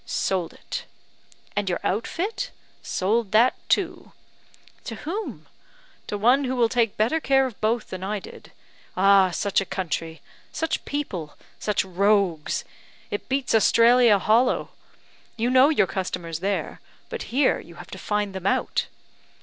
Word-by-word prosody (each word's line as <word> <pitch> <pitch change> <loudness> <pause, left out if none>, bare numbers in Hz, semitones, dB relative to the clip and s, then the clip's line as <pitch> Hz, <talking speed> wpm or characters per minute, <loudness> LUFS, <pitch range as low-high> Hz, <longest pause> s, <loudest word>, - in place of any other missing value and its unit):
"Sold 185 -4 -1
it." - - -7 0.7
"And 205 -2 0
your 175 - -1
outfit?" 370 - -2 0.3
"Sold 210 +2 0
that 235 +4 +5 0.2
too." - - 0 0.7
"To 225 - -5
whom?" 380 - -5 0.6
"To 205 - -3
one 250 +7 +4
who 260 0 -1
will 235 -2 +3
take 230 -4 +1
better 235 +9 +2
care 270 -3 +3
of 250 -6 -7
both 220 +1 0
than 185 0 -5
I 210 +2 -2
did. 195 - -12 0.5
Ah! 195 0 +6
such 195 +3 0
a - - -1
country! 165 -4 -4 0.3
such 320 +1 -2
people! 190 - -4 0.2
such 210 -2 0
rogues! 190 -4 +1 0.5
It 205 - -4
beats 270 0 0
Australia 230 0 +5
hollow; 225 +6 +2 0.7
you 235 +2 +1
know 260 +2 +6
your 310 - +3
customers 175 -4 -4
there 195 +2 -2 0.3
but 470 -2 -5
here 265 +3 +2
you 170 - -13
have 175 +1 -12
to 190 - -7
find 210 -1 -1
them 190 0 -3
out. - - 0
210 Hz, 145 wpm, -24 LUFS, 190-250 Hz, 0.7 s, Ah